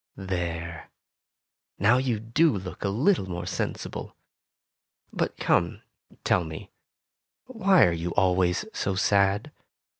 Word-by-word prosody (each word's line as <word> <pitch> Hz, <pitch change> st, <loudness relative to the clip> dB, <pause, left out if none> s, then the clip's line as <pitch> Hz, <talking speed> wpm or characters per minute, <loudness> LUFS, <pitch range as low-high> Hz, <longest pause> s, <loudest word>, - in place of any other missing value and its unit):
There! 85 Hz, -3 st, -4 dB, 0.9 s
Now 110 Hz, +6 st, +4 dB
you 125 Hz, -4 st, -1 dB
do 115 Hz, +4 st, +2 dB
look 90 Hz, -2 st, -7 dB
a 100 Hz, -, 0 dB
little 120 Hz, -, +1 dB
more 90 Hz, -1 st, -4 dB
sensible. -, -, -4 dB, 1.0 s
But -, -, -2 dB
come, -, -, +1 dB, 0.4 s
tell 90 Hz, -, +2 dB
me, 80 Hz, -1 st, -8 dB, 0.7 s
why 195 Hz, -7 st, +4 dB
are 85 Hz, -, +2 dB
you 85 Hz, +1 st, -3 dB
always 90 Hz, -1 st, +2 dB
so 95 Hz, -, -1 dB
sad 100 Hz, +6 st, +2 dB
95 Hz, 115 wpm, -26 LUFS, 90-120 Hz, 1.0 s, Now